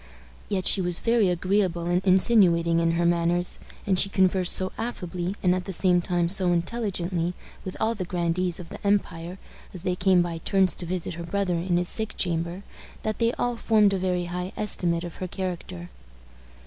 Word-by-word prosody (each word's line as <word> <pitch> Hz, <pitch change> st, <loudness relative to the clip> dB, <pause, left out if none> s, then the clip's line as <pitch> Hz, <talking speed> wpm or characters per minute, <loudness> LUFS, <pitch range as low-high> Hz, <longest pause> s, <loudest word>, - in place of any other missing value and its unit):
Yet 190 Hz, -3 st, -1 dB
she 195 Hz, -, +4 dB
was 175 Hz, -1 st, +1 dB
very 230 Hz, -4 st, +2 dB
agreeable 180 Hz, -1 st, 0 dB
and 175 Hz, +2 st, 0 dB
insinuating 180 Hz, -4 st, +4 dB
in 165 Hz, 0 st, +1 dB
her 170 Hz, +1 st, +1 dB
manners; 175 Hz, +1 st, +1 dB, 0.3 s
and 190 Hz, -2 st, +2 dB
she 195 Hz, -, +3 dB
conversed 185 Hz, -2 st, +3 dB
so 185 Hz, 0 st, +2 dB
affably, 180 Hz, -5 st, -4 dB
and 180 Hz, -1 st, +4 dB
at 180 Hz, -1 st, -3 dB
the 195 Hz, -, -5 dB
same 180 Hz, 0 st, +3 dB
time 175 Hz, -1 st, 0 dB
so 185 Hz, 0 st, +1 dB
intelligently, 175 Hz, -2 st, -2 dB, 0.3 s
with 185 Hz, -, -7 dB
all 220 Hz, +1 st, +1 dB
the 205 Hz, -5 st, -4 dB
grandees 175 Hz, 0 st, -1 dB
of 175 Hz, -, -9 dB
the -, -, -10 dB
empire, 185 Hz, -3 st, -1 dB, 0.4 s
as 180 Hz, -, -9 dB
they 180 Hz, -2 st, 0 dB
came 180 Hz, -1 st, +3 dB
by 170 Hz, -1 st, -4 dB
turns 190 Hz, +2 st, +2 dB
to 175 Hz, -, -2 dB
visit 180 Hz, 0 st, -3 dB
her 170 Hz, +1 st, -7 dB
brother 190 Hz, +1 st, -1 dB
in 175 Hz, +1 st, 0 dB
his 175 Hz, 0 st, +1 dB
sick 220 Hz, +2 st, 0 dB
chamber, 170 Hz, +2 st, -2 dB, 0.4 s
that 215 Hz, 0 st, -3 dB
they 230 Hz, 0 st, +2 dB
all 245 Hz, 0 st, -1 dB
formed 215 Hz, -3 st, +3 dB
a 195 Hz, -, 0 dB
very 180 Hz, -1 st, -1 dB
high 180 Hz, +2 st, -5 dB
estimate 175 Hz, -5 st, 0 dB
of 175 Hz, -1 st, -8 dB
her 185 Hz, -, -4 dB
character. 175 Hz, -, -6 dB
180 Hz, 190 wpm, -25 LUFS, 175-195 Hz, 0.4 s, she